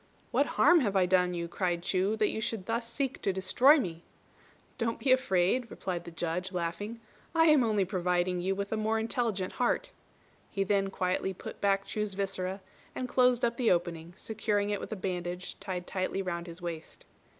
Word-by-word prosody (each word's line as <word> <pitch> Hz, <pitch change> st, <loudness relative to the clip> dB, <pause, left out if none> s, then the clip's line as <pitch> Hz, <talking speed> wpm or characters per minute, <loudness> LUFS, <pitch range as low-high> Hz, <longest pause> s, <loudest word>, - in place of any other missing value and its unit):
"What -, -, +3 dB
harm 350 Hz, -1 st, +7 dB
have 205 Hz, -8 st, 0 dB
I 190 Hz, -1 st, +5 dB
done 180 Hz, -1 st, +2 dB
you?" 170 Hz, 0 st, -3 dB
cried 175 Hz, -1 st, -1 dB
Chu, 190 Hz, +3 st, +1 dB
"that 215 Hz, -1 st, +1 dB
you 220 Hz, -, -3 dB
should 220 Hz, -4 st, -3 dB
thus 230 Hz, +1 st, -2 dB
seek 275 Hz, -1 st, -2 dB
to 195 Hz, -, +1 dB
destroy 195 Hz, +11 st, +5 dB
me?" 170 Hz, -, -3 dB, 0.8 s
"Don't 230 Hz, -1 st, 0 dB
be 265 Hz, -, +1 dB
afraid," 235 Hz, -1 st, +2 dB
replied 175 Hz, -2 st, -4 dB
the -, -, -6 dB
Judge, 175 Hz, +3 st, -3 dB
laughing, 185 Hz, +6 st, -3 dB, 0.4 s
"I 325 Hz, 0 st, +6 dB
am 300 Hz, -4 st, +6 dB
only 210 Hz, -4 st, +2 dB
providing 180 Hz, -1 st, 0 dB
you 190 Hz, +2 st, 0 dB
with 200 Hz, 0 st, -4 dB
a 220 Hz, -, 0 dB
more 220 Hz, +1 st, +1 dB
intelligent 220 Hz, -4 st, -1 dB
heart." 245 Hz, -, +1 dB, 0.6 s
He 195 Hz, -, 0 dB
then 195 Hz, 0 st, +2 dB
quietly 185 Hz, 0 st, -1 dB
put -, -, -9 dB
back 195 Hz, -1 st, +2 dB
Chu's 210 Hz, -2 st, -3 dB
viscera, 190 Hz, -1 st, -3 dB, 0.3 s
and 255 Hz, -, -3 dB
closed 250 Hz, -1 st, +3 dB
up 235 Hz, 0 st, -1 dB
the 245 Hz, -3 st, +2 dB
opening, 170 Hz, -1 st, 0 dB
securing 210 Hz, -2 st, -1 dB
it 205 Hz, -, -1 dB
with -, -, -7 dB
a -, -, -1 dB
bandage 180 Hz, -2 st, -4 dB
tied 185 Hz, -3 st, -4 dB
tightly 190 Hz, +1 st, -2 dB
round 170 Hz, -1 st, -3 dB
his 170 Hz, +1 st, -9 dB
waist. 165 Hz, -2 st, -7 dB
195 Hz, 190 wpm, -30 LUFS, 180-225 Hz, 0.8 s, harm